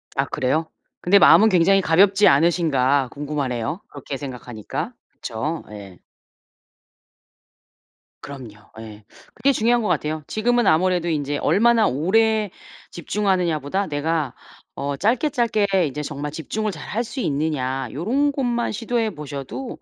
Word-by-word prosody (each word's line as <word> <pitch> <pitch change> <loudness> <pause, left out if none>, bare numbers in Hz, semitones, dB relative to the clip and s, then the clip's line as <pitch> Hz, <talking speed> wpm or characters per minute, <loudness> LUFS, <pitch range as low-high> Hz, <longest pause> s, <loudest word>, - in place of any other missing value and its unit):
아 135 0 +1
그래요? 150 +4 -1 0.3
근데 200 +3 +5
마음은 220 +1 +7
굉장히 195 +2 +4
가볍지 195 +5 +4
않으신가 140 -4 +2
궁금하네요. 145 - -3
그렇게 140 -1 -7
생각하니까. 125 -5 -6 0.2
그쵸? 150 +8 -5
예. 100 -4 -11 2.2
그럼요. 120 -7 -11
예. 110 -2 -11 0.3
그게 275 - +2
중요한 235 0 +2
것 210 - -2
같아요. 155 0 -1
지금은 240 +2 +1
아무래도 175 +1 +2
인제 145 -2 -1
'얼마나 230 +1 +3
오래 215 - +1 0.4
집중하느냐.'보다 180 -2 -1
'내가 150 -2 -1 0.4
어 140 0 -3
짧게 240 - +1
짧게 230 -5 +1 0.2
이제 150 +3 -5
정말 145 0 -5
집중을 205 +8 -3
잘 - - -9
할 230 +3 -2
수 240 +3 -7
있느냐.' 135 - -2
요런 260 - 0
것만 245 -4 -1
시도해 225 -1 -2
보셔도 150 - -7
160 Hz, 300 characters per minute, -22 LUFS, 140-215 Hz, 2.2 s, 마음은